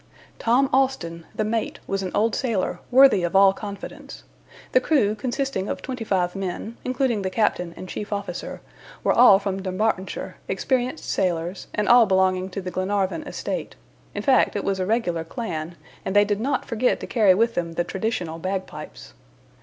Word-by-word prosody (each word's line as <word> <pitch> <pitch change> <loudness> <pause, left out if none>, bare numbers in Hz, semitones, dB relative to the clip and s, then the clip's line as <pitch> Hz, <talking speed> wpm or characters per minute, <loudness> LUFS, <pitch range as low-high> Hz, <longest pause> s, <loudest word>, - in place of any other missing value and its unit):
Tom 250 +4 +3
Austin, 175 -12 0
the - - 0
mate, 220 +1 -2
was 195 0 -2
an 185 - -3
old 225 +2 +2
sailor, 230 -8 -1
worthy 255 -6 +6
of 175 +1 -2
all 195 0 +7
confidence. 200 -1 -8 0.5
The 255 - +4
crew, 255 -9 +2
consisting 240 -2 -2
of - - -4
twenty 255 -3 -4
five 180 -4 0
men, 195 +4 -4
including 250 -4 0
the 190 - -1
captain 185 -4 0
and 185 - -8
chief 210 +3 -6
officer, 200 -4 -4 0.4
were - - +3
all 235 -5 +8
from 195 -1 -3
Dumbartonshire, 190 0 -2
experienced 255 +2 -1
sailors, 175 0 -1
and 210 - 0
all 240 -2 +7
belonging 190 -1 +2
to 195 +1 -5
the 185 0 -5
Glenarvan 190 -2 -1
estate; - - -4 0.4
in - - -3
fact, 265 -5 +3
it 205 - -1
was 195 -1 -1
a 185 - -1
regular 190 -7 0
clan, 165 -3 -5 0.3
and 190 - -3
they 205 0 +6
did 205 0 -1
not 270 +6 -1
forget 240 +2 +1
to - - -4
carry 210 -6 +4
with 230 +3 +2
them 170 -3 -2
the 175 - 0
traditional 180 -5 -3
bagpipes. 190 +2 -6
200 Hz, 175 wpm, -24 LUFS, 185-230 Hz, 0.5 s, all